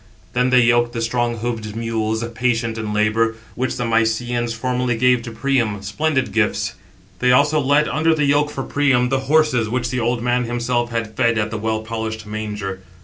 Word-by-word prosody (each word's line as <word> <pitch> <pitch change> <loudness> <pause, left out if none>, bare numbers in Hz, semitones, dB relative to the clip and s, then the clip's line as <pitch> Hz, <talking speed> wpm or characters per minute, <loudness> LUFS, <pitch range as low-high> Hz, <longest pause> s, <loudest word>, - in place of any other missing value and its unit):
Then 125 +1 +2
they 125 -1 +5
yoked 120 0 +3
the 115 - -3
strong 120 0 0
hoofed 110 -2 -4
mules, 110 -1 -1
patient 115 -2 0
in 110 -1 -3
labour, 110 +2 +1 0.2
which 130 +1 -2
the 125 - -2
Mysians 115 +1 0
formerly 125 +1 -1
gave 125 0 +3
to 115 - -7
Priam, 115 -4 0
splendid 130 +3 -1
gifts. 110 +1 0 0.5
They 125 0 +3
also 145 +4 +4
led 145 +2 +3
under 160 +1 +2
the 150 -2 +1
yoke 145 +1 +2
for 135 -2 -4
Priam, 135 -4 +2
the 135 0 +1
horses, 150 -8 +3
which 120 0 -1
the 125 - -1
old 120 0 0
man 125 0 +1
himself 120 0 -1
had 115 -2 -4
fed 115 -2 +2
at 110 0 -1
the 110 - -3
well 110 0 -1
polished 110 -1 -4
manger. 105 -3 -5
120 Hz, 190 wpm, -20 LUFS, 110-125 Hz, 0.5 s, they